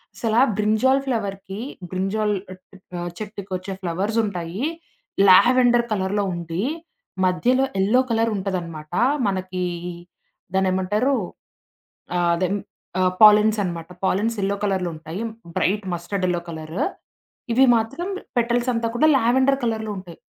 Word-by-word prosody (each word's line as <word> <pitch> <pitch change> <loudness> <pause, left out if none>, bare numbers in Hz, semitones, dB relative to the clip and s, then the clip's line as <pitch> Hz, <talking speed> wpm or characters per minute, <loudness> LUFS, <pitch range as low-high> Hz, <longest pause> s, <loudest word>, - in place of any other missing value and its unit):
అసలా 225 +1 +2 0.2
brinjal 220 +6 +3
ఫ్లవర్‌కి 200 -4 -3 0.3
brinjal 200 +3 0 0.7
ఆహ్, 175 0 -3
చెట్టుకొచ్చే 195 -3 -5
flowers 190 +6 -1
ఉంటాయి 185 - -4 0.6
లావెండర్ 240 +4 +6
కలర్‌లో 200 +1 0
ఉండి, 170 +2 -3 0.6
మధ్యలో 250 +9 +2 0.2
ఎల్లో 225 +6 +4
కలర్ 225 0 +2
ఉంటదనమాట. 170 -5 -4 0.4
మనకీ 185 -1 -2 0.9
దాన్నేమంటారు, 190 +7 +1 1.0
ఆహ్, 175 -1 +2
అదే 185 0 0 0.5
ఆహ్, 185 0 +2
పాలిన్స్ 215 0 +7
అనమాట. 170 -1 -5 0.2
పాలిన్స్ 215 +4 +1
ఎల్లో 200 +1 0
కలర్‌లో 185 -3 0
ఉంటాయి. 160 +6 -7 0.4
Bright 205 +2 +1
mustard 185 +3 -3
yellow 175 -1 -1
colour. 160 +1 -7 0.8
ఇవి 265 +3 +6
మాత్రం 275 +11 -3 0.3
పెటల్స్ 240 +1 +1
అంతా 230 0 0
కూడా 305 +6 +4
లావెండర్ 265 +3 +3
కలర్‌లో 220 -1 -2
ఉంటాయి. 180 -3 -10
200 Hz, 110 wpm, -22 LUFS, 185-230 Hz, 1.0 s, పాలిన్స్